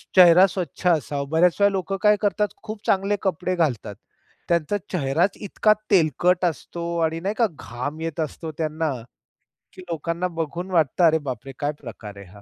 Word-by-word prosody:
चेहरा 180 +1 +8
स्वच्छ 180 -1 -4
असावा. 145 -4 +1
बऱ्याच 170 +2 +4
वेळा 200 0 +5
लोकं 195 0 -2
काय 210 0 +6
करतात. 210 0 +1 0.2
खूप 215 0 -8
चांगले 195 +1 +2
कपडे 185 -1 -1
घालतात. 125 - -1 0.5
त्यांचा 170 +4 +1
चेहराच 170 +3 +1
इतका 215 +1 +2 0.2
तेलकट 180 +1 +3
असतो 170 +1 -3 0.2
आणि 165 +1 -2
नाही 200 +5 -2
का, 235 - +4
घाम 145 +6 -5
येत 165 -1 -4
असतो 160 +1 -5
त्यांना. 155 -1 -1 0.8
की - - -11
लोकांना 170 +2 -2
बघून 170 +2 -5
वाटतं, 165 0 +2
"अरे 160 0 +5
बापरे! 130 +2 -5
काय 145 0 0
प्रकार 105 -4 -9
आहे 100 - -10
हा." 100 +3 -15
170 Hz, 165 wpm, -23 LUFS, 150-185 Hz, 0.8 s, चेहरा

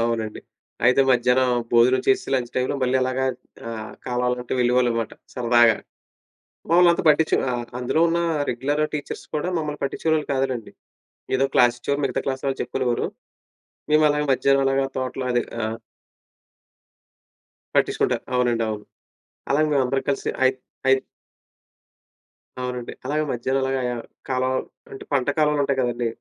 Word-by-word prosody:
అవునండి. 115 -2 -2 0.5
అయితే 125 +2 +5
మధ్యాహ్నం 125 +1 +3 0.2
భోజనం 120 +2 +5
చేసి 395 -1 +2
లంచ్ 120 -2 -1
టైమ్‌లో 130 +2 0
మళ్ళీ 130 +1 +2
అలాగా 130 +1 0 0.5
ఆహ్, 110 -1 -6
కాలవల 125 0 0
గట్టు 125 +1 -4
వెళ్ళేవాళ్ళమాట 120 -2 +1 0.2
సరదాగా. 120 -2 +4 0.9
మమ్మలంతా 170 0 +5
పట్టించుకు 155 +1 +3 0.4
అందులో 125 +6 +1
ఉన్న 170 +1 +1 0.3
రెగ్యులర్ 140 +5 -1
టీచర్స్ 145 -2 -5
కూడా 165 +4 -1
మమ్మల్ని 150 -2 -3
పట్టించుకునేవాళ్ళు 155 +2 0
కాదులెండి. 130 -4 -2 0.7
ఏదో 135 - +2
క్లాసిచ్చేవారు. 120 +4 +2
మిగతా - - -1
క్లాస్ 130 -1 -2
వాళ్ళు 135 -1 -2
చెప్పుకునేవారు. 125 -3 -1 0.9
మేము 155 0 +5
అలాగ 150 0 +1
మధ్యాహ్నం 135 +1 +3
అలాగా 135 0 +2
తోటలో 130 0 -3
అది 120 - +2 0.2
ఆ! - - 0 2.1
పట్టించుకుంటారు. - - +1
అవునండి. 120 -2 +2
అవును. 105 -1 -5 0.6
అలాగే 155 +3 +3
మేమందరం 135 0 +1
కలిసి 140 - -1
అయి 130 0 +4 0.3
అయి 135 0 +5 1.6
అవునండి. 125 -1 -4
అలాగే 150 +3 0
మధ్యాహ్నం 130 +3 -1
అలాగా 135 0 0 0.5
కాలువలు 130 0 0 0.3
అంటే 135 - -9
పంట 135 -1 +1
కాలువలుంటాయి 145 -3 +2
కదండీ! 120 -1 -1
130 Hz, 125 wpm, -23 LUFS, 120-140 Hz, 2.1 s, అయితే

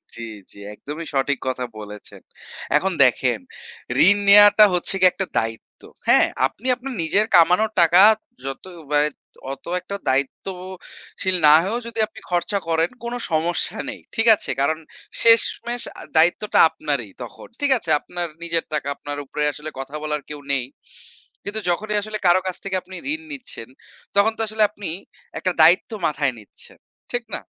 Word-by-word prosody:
জি, 115 - -9 0.3
জি। - - -15 0.2
একদমই 150 +9 -8
সঠিক 135 0 +1
কথা 130 -1 -2 0.2
বলেছেন। 105 -1 -10 0.6
এখন - - -1
দেখেন - - +2 0.7
ঋণ 205 - +6
নেওয়াটা 205 +1 +8
হচ্ছে 180 +2 +1
গিয়ে 185 - +7
একটা 190 - -2
দায়িত্ব, 115 0 -4 0.3
হ্যাঁ? - - +5 0.2
আপনি 245 - -11
আপনার 260 +1 -7
নিজের 200 +6 +2
কামানো 180 +5 +5
টাকা 175 +2 +6 0.4
যত 135 0 -5 0.3
ব্যয় 150 0 +3 0.4
অত 135 - -9 0.2
একটা 200 - -6
দায়িত্বশীল 185 +6 -4
না 150 - +8
হয়েও 215 +6 -2
যদি 230 -1 -6
আপনি 220 - -14
খরচা 175 +4 0
করেন, 165 +1 +1
কোন 235 0 -4 0.2
সমস্যা 165 +2 -1
নেই, - - -8
ঠিক 225 0 +1
আছে? - - -8
কারণ 155 +3 +1 0.4
শেষমেষ 230 +1 +3 0.2
আ - - -9 0.2
দায়িত্বটা 175 +6 +3
আপনারই 140 -10 -4
তখন। 120 - -11
ঠিক 285 -1 +2
আছে 195 - -8
আপনার 175 +2 -5 0.2
নিজের 170 -1 -1
টাকা 145 -2 -2
আপনার 145 +1 -7
উপরে 150 +2 -3
আসলে 150 +2 -8
কথা 135 +2 -7
বলার 150 -1 -2
কেউ 150 -1 -7
নেই। 130 -3 -1 0.8
কিন্তু 205 +2 -4
যখনই 210 +5 -1
আসলে 215 +1 -4
কারো 175 +1 +5
কাছ 185 - -3
থেকে 195 -1 -3
আপনি 185 +1 -11 0.2
ঋণ 315 - -5
নিচ্ছেন, 255 - -8 0.5
তখন 200 +2 +4
তো - - -1
আসলে 215 0 +1
আপনি 205 -3 -6 0.5
একটা 185 - 0
দায়িত্ব 170 +8 +5 0.2
মাথায় 145 -3 0
নিচ্ছেন, 105 - -14 0.4
ঠিক 245 0 -1
না? - - -6
175 Hz, 160 wpm, -21 LUFS, 145-205 Hz, 0.8 s, নেওয়াটা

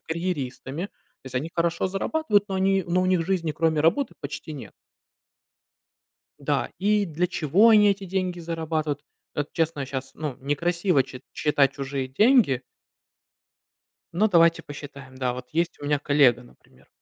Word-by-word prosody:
карьеристами. 160 -2 -4
То 170 - -26
есть, 130 - -9
они 150 +6 -2
хорошо 170 +1 0
зарабатывают, 205 +3 +1
но 195 - -3
они 190 0 +2
но 175 +1 +1
у - - +1
них 180 -3 +2
жизни 180 -4 0
кроме 160 -1 +1
работы 215 - +2
почти 155 - -6
нет. 140 - -9 1.7
Да, - - -1
и 205 +1 +2
для 170 +1 -1
чего 185 +6 +4
они 210 -2 +6
эти 200 0 -1
деньги 185 -1 -2
зарабатывают? 160 -3 -2 0.3
Это 145 0 -2
честно, 165 -3 0
я - - -3
щас 135 0 -5
ну 150 -5 -4
некрасиво 170 +2 +1
чит 130 - -11
считать 140 -3 +2
чужие 135 -1 -4
деньги 205 - +4 1.5
но 210 +5 +3
давайте 170 -3 +4
посчитаем. 140 -2 -10
Да, 130 -1 -1
вот 125 0 -8
есть 170 +2 -1
у 145 - -7
меня 145 -1 +1
коллега, 140 -5 +3
например. 120 - -22
165 Hz, 155 wpm, -25 LUFS, 140-185 Hz, 1.7 s, они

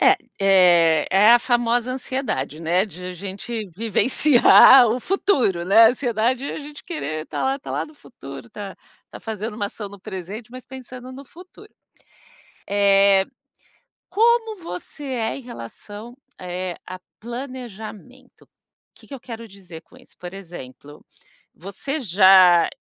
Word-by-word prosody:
É, 390 - +5 0.2
eh, 175 -5 +4
é 200 +3 +4
a - - +5
famosa 240 0 0
ansiedade, 250 - -4
né, 175 +4 0
de 180 -3 -12
a 185 - -7
gente 200 +4 -7
vivenciar 245 +3 +6
o 230 +3 -1
futuro, 255 - 0
né, 220 +4 +7
ansiedade, 245 +1 -1
é - - -5
a - - -7
gente 295 0 -12
querer 155 - -5
tá - - -4
lá, 270 +1 -1
tá - - -10
lá - - -2
no 310 - -17
futuro, 190 - -12
tá 205 -3 -8 0.4
tá - - -11
fazendo 220 0 -6
uma 210 -1 -3
ação 205 0 -8
no 200 -1 -13
presente, 195 +6 -8
mas 255 0 -11
pensando 255 0 -11
no 275 +2 -11
futuro. 365 +8 -16 1.0
Eh, 200 -1 +3 0.9
como 450 0 +2
você 290 - -8
é 240 -5 -3
em - - -10
relação, 225 - -11 0.2
eh, 180 0 -5
a 185 0 -8 0.2
planejamento? 245 0 -10
O - - -47 0.5
que - - -20
que - - -12
eu 270 - -8
quero 230 -1 -9
dizer 185 -5 -13
com - - -22
isso? 255 - -22
Por 175 0 -9
exemplo, 150 -6 -12 0.5
você 200 - -6
já, 185 - +5
220 Hz, 150 wpm, -21 LUFS, 185-255 Hz, 1.0 s, né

